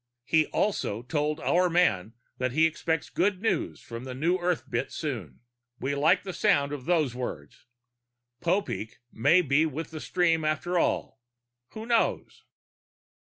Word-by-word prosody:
He 155 +4 +3
also 120 - -1
told 150 +3 -1
our 180 +1 +3
man 115 - +2 0.3
that 125 -1 -1
he 160 +3 +4
expects 160 0 -1
good 195 -1 +1
news 200 -5 -1
on 115 +1 -5
the 130 -1 -6
New 170 +7 +1
Earth 175 -1 -1
bit 120 +2 -2
soon. 115 - -5 0.4
We 135 +2 -1
like 145 +3 +3
the 190 -1 -5
sound 145 -10 +2
of 135 -3 -6
those 160 -8 +2
words. 115 - -7 0.7
Popeek 170 - -1
may 160 +10 +4
be 150 +2 +3
with 155 +2 -5
the 155 -1 -6
stream 165 -3 +1
after 170 +3 0
all. 135 - -1 0.5
Who 220 0 -7
knows? 230 -1 0
155 Hz, 150 wpm, -27 LUFS, 130-175 Hz, 0.7 s, he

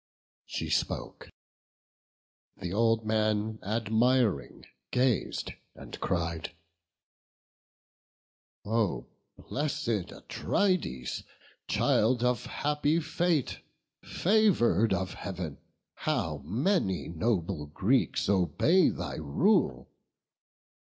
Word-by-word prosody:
She - - -4
spoke: - - -2 1.3
th' 90 0 -4
old 115 +1 +2
man 110 0 0
admiring 110 - +1 0.2
gaz'd, 125 -3 0 0.2
and - - -10
cried, 85 -2 -2 2.1
"Oh 110 -2 0 0.3
bless'd 140 - -2
Atrides, 65 - -1 0.5
child 120 +2 +2
of 125 -3 +1
happy 150 +2 0
fate, 165 -2 0 0.4
Favour'd 175 - +3
of 95 -1 -1
Heav'n! 90 -6 -6 0.3
how - - -2
many 110 - 0
noble 85 -3 -1
Greeks 100 - +1
Obey 100 - +3
thy - - -4
rule! 80 - +1
110 Hz, 75 wpm, -29 LUFS, 90-140 Hz, 2.1 s, Favour'd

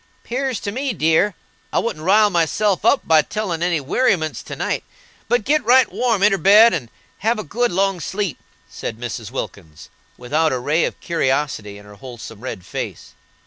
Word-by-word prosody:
"'Pears 260 -1 -2
to 200 - -4
me, 260 +3 -2
dear, 165 +3 +2 0.4
I - - -1
wouldn't 195 -10 -2
rile 205 +4 +4
myself 180 +4 +1
up 280 - +3
by 160 -1 +6
telling 180 -1 -4
any 175 -2 +1
werryments 155 - 0
to - - -6
night, - - -2 0.4
but 240 -1 +1
git 300 +2 +2
right 255 +2 +5
warm 230 -6 0
inter 200 -2 +4
bed, 210 +4 +7
and 130 -9 -3 0.3
have 225 +3 +1
a 215 - -4
good 240 +9 -1
long 195 0 +1
sleep," 190 -1 -3 0.3
said 110 - -6
Mrs. 115 -2 -6
Wilkins, 90 - -7 0.3
without 155 +6 0
a - - 0
ray 150 +7 +1
of - - -5
curiosity 135 - -1
in 105 - -14
her 105 - -13
wholesome 115 0 -10
red 110 -7 -7
face. - - -6
170 Hz, 180 wpm, -20 LUFS, 130-215 Hz, 0.4 s, bed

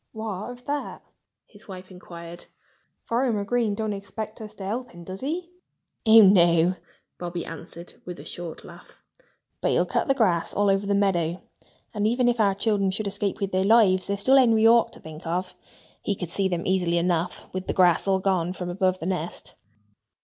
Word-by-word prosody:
"What 215 -1 -5
of 245 0 -11
that?" 290 0 -4 0.4
his 205 0 -19
wife 185 -1 -10
inquired. 170 -1 -11 0.6
"Farmer 230 -3 0
Green 230 -2 0
doesn't 215 0 -2
expect 205 +3 -7
us 215 -1 -9
to 195 - -7
help 240 +5 -3
him, 175 0 -12
does 185 +2 -8
he?" 340 +6 -4 0.6
"Oh, 220 0 +9
no!" 175 -3 +5 0.5
Bobby 175 -1 -4
answered 165 +1 -10
with 180 -1 -8
a - - -10
short 175 -2 -7
laugh. - - -15 0.6
"But - - +1
he'll - - +2
cut - - -1
the 270 - +3
grass 185 -10 +1
all 205 -1 +3
over 195 +1 0
the 200 - +2
meadow. 180 -4 0 0.5
And 210 -1 0
even 245 +2 +2
if 240 -1 +1
our 200 -3 +3
children 200 -2 +1
should 205 +3 -3
escape 200 0 -2
with 200 -1 -2
their 185 0 +1
lives, 195 -3 +4
there's 200 0 -2
still 265 +6 +5
Henry 230 -4 +4
Hawk 230 +1 +5
to - - -13
think 160 +1 -10
of. 180 +2 -2 0.5
He 200 - -1
could 180 -3 -6
see 195 +1 +1
them 175 -2 -3
easily 180 -2 +1
enough, 175 0 -1
with 185 0 -4
the - - -1
grass 180 0 +3
all 195 -1 +3
gone 185 -2 0
from 180 -1 -5
above 185 0 +1
the 165 - -7
nest." 180 -2 -4
195 Hz, 195 wpm, -25 LUFS, 180-220 Hz, 0.6 s, Oh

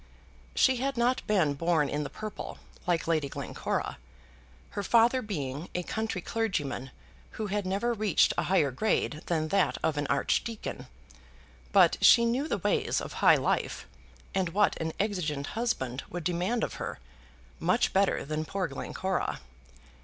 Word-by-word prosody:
She 260 -1 +4
had 270 +1 -2
not 245 +2 +2
been 185 -9 +3
born 160 0 +1
in 145 +2 -2
the 145 - -4
purple, 215 -1 -7 0.3
like 175 -2 +1
Lady 155 -4 +1
Glencora, - - -3 0.7
her 205 - -3
father 235 +5 +4
being 150 - -4
a 180 - -1
country 220 -1 -3
clergyman 170 - -2 0.5
who 215 - -2
had 205 -1 -2
never 205 +6 0
reached 215 -4 +3
a - - 0
higher 165 -8 +3
grade 155 - 0
than 155 -2 0
that 195 +1 +2
of 155 -2 +1
an 145 -1 -1
archdeacon; 215 +10 -1 0.8
but 185 -4 +5
she 235 +3 +8
knew 250 +6 0
the - - 0
ways 455 -2 +1
of - - -6
high - - +7
life, - - -1 0.5
and 190 -2 +1
what 210 0 +4
an 160 0 -1
exigeant 170 -9 -1
husband 140 - -1
would 175 -1 -5
demand 180 +8 0
of - - -2
her, - - -4 0.6
much - - +2
better 195 0 +2
than 155 +2 -2
poor 190 +3 -2
Glencora. 185 +6 -3
190 Hz, 155 wpm, -29 LUFS, 155-220 Hz, 0.8 s, she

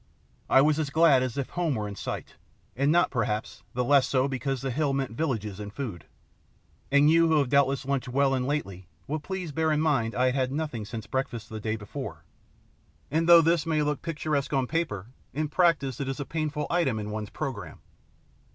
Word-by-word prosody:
I 135 - +6
was 150 +2 +3
as 150 -3 -1
glad 150 -3 +5
as 130 -1 -3
if 140 - -2
home 170 -5 -1
were 105 -2 -2
in 100 - -6
sight, - - -5 0.4
and 140 +4 +2
not, 175 +2 +3
perhaps, 110 -3 -2
the 125 - +1
less 140 +1 +4
so 130 0 +2
because 135 0 -3
the 135 - -1
hill 145 +2 0
meant 135 -3 -1
villages 110 -7 -2
and 105 -1 -6
food; 110 - -6 0.9
and 140 +1 +5
you 165 +1 +5
who 160 -1 +3
have 140 -4 +2
doubtless 140 -1 +2
lunched 135 -2 -1
well 135 +1 +2
and 130 -1 0
lately 100 - -3 0.2
will 155 +3 -2
please 185 0 -5
bear 160 +2 +1
in 150 - +2
mind 135 -8 +1
I 125 - +2
had - - -4
had 130 -1 0
nothing 145 -8 -3
since 110 0 -6
breakfast 120 -5 -3
the 110 - -6
day 110 +1 -2
before; 105 -2 -7 0.9
and 165 +3 +1
though 170 -1 +10
this 165 0 +2
may 155 -2 +2
look 150 -1 -1
picturesque 150 -3 -2
on 135 -2 +2
paper, 155 - -2 0.3
in 155 0 -1
practice 150 -6 +2
it 140 - -2
is 135 - -4
a 140 - -3
painful 150 -1 -2
item 165 -10 +1
in 105 0 -4
one's 105 -1 -4
programme. 135 -9 -6
140 Hz, 205 wpm, -27 LUFS, 120-155 Hz, 0.9 s, though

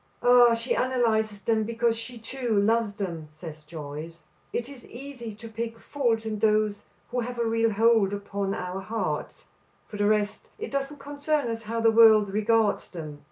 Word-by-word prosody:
"Ah, 245 -1 +7
she 230 +2 -1
analyzes 220 -5 +1
them 220 0 +1
because 230 +1 0
she 235 +2 -7
too 230 -1 -1
loves 220 0 +2
them," 170 -6 -5
says 155 -1 -9
Joyce. 155 +1 -8 0.3
"It 235 - -2
is 270 -3 -11
easy 245 -4 -8
to 230 +2 -10
pick 230 +1 -5
faults 230 -3 -1
in 215 -1 -3
those 215 -1 +2 0.3
who 250 - -1
have 245 +1 -4
a 235 - 0
real 225 0 +2
hold 220 -1 +4
upon 200 -1 -3
our 180 +1 -4
hearts. 220 +4 -3 0.4
For 210 - -8
the 205 0 +2
rest 210 0 0
it 445 - -6
doesn't 275 +1 -2
concern 285 -2 -1
us 225 0 -4
how 230 +1 -3
the 225 0 +5
world 220 -2 +7
regards 215 0 +2
them." 155 -4 -8
225 Hz, 175 wpm, -26 LUFS, 205-235 Hz, 0.4 s, Ah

